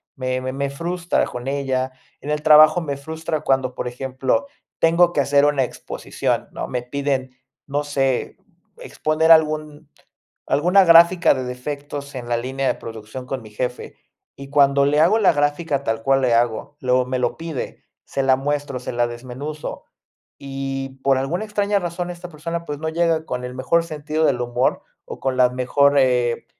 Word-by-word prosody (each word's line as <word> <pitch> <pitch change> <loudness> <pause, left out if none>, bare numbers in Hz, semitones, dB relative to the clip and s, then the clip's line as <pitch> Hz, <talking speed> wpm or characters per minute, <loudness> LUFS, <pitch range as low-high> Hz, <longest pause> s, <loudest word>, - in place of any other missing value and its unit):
Me 130 0 -2
me 130 0 -4
me 140 +1 -2
frustra 175 +4 -1
con 125 +1 -7
ella. 135 -2 -1 0.3
En 150 - -4
el 150 0 -1
trabajo 155 +2 +7
me 140 -4 -4
frustra, 160 +2 -4
cuando, 130 -3 0
por - - -4
ejemplo, 130 - -2 0.3
tengo 170 +1 +4
que 145 - +2
hacer 140 +1 +3
una 145 -2 +2
exposición, - - -4
¿no? - - -5
Me 125 - -3
piden, 135 0 -2 0.4
no 145 +1 -1
sé, 135 -3 -1 0.4
exponer 155 +1 +1
algún 155 -1 +3 0.6
alguna 180 +6 +4
gráfica 170 +1 +6
de 130 -1 -3
defectos 140 +3 -6
en 125 -2 -6
la 120 - +1
línea 130 +3 -2
de - - +1
producción 115 +3 -8
con 130 0 -4
mi 110 - -12
jefe. 125 +3 -4 0.4
Y 140 0 -10
cuando 140 -1 +4
le 150 +1 +2
hago 175 +8 +4
la 210 - +4
gráfica, 145 -1 0
tal 115 -2 -2
cual, 135 +2 +3
le 125 -2 +3
hago 120 +4 0
luego 125 0 +2
me 130 0 -2
lo 120 -1 -1
pide, 160 -5 -6 0.2
se 135 - -2
la 135 0 +4
muestro, 145 -1 -2
se 125 - -5
la 120 0 +1
desmenuzo. 130 +6 -7 0.6
Y, 135 -1 -5
por 135 -1 +3
alguna 170 +10 -2
extraña 205 -1 0
razón 175 0 -4
esta 175 0 -8
persona, 165 +2 -5
pues, 145 -3 -5
no 160 +1 -3
llega 165 -1 +1
con 125 0 -4
el 125 0 -6
mejor 150 +6 +1
sentido 155 -1 -2
del 125 -3 +1
humor, 120 +1 0 0.3
o - - -8
con 130 -1 -1
la 125 -1 +4
mejor, 140 +3 +2
eh, 125 -3 +1
140 Hz, 180 wpm, -21 LUFS, 130-155 Hz, 0.6 s, trabajo